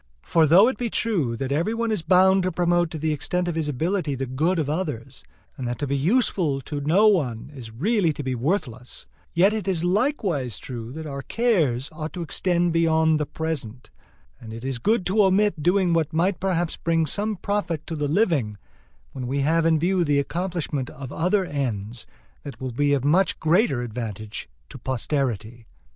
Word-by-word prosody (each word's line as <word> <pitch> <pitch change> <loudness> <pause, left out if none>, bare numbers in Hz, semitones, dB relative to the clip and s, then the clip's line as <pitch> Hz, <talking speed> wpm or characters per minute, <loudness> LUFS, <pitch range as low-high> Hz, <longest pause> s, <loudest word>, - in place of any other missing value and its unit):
For 160 -2 +3
though 185 +8 +7
it 260 - -2
be 240 -2 -1
true 175 - 0
that 135 +2 -4
every 170 +10 0
one 230 0 -1
is 215 - 0
bound 190 +3 +5
to 185 0 -1
promote 175 0 +1
to 160 - -6
the 155 0 0
extent 180 +4 -1
of 175 - -1
his 160 -2 -1
ability 160 +1 -1
the 135 +1 -3
good 155 +9 0
of 155 -4 0
others, 145 -6 -4 0.3
and 125 - -5
that 120 - -3
to 145 - -2
be 140 0 -1
useful 165 - +1
to 145 +3 -5
no 175 +9 +4
one 140 - +1
is 125 -5 -9
really 175 - +1
to 145 - -6
be 130 -1 -2
worthless, 125 - -3 0.3
yet 190 +5 +4
it 215 -4 -3
is 175 -4 +1
likewise 180 - 0
true 120 -2 -7
that 160 +1 -7
our 140 -2 -5
cares 155 - +1
ought 155 0 -6
to 175 - -4
extend 175 +1 +1
beyond 160 -1 +3
the 150 - -2
present, 130 -7 -4 0.5
and 110 -2 -9
it 115 +3 -8
is 135 -2 -2
good 210 - +1
to 205 +3 +3
omit 190 -3 +2
doing 180 +2 +2
what 165 -3 +1
might 175 +2 +1
perhaps 175 -3 -1
bring 165 -1 +1
some 210 +7 -1
profit 190 -5 -2
to 165 - -5
the 150 -1 -1
living, 145 - +1 0.5
when 125 -2 -5
we 140 +2 -1
have 165 +3 +2
in 160 -1 +4
view 180 +3 +1
the 145 -3 +2
accomplishment 165 -3 -2
of 130 -1 -9
other 185 +5 +1
ends 115 - -4 0.3
that 140 - -9
will 130 -1 -4
be 145 +4 +2
of 135 -1 -2
much 180 +6 +2
greater 160 - +2
advantage 110 - -6 0.2
to - - -11
posterity. 120 -4 -2
160 Hz, 195 wpm, -24 LUFS, 135-180 Hz, 0.5 s, though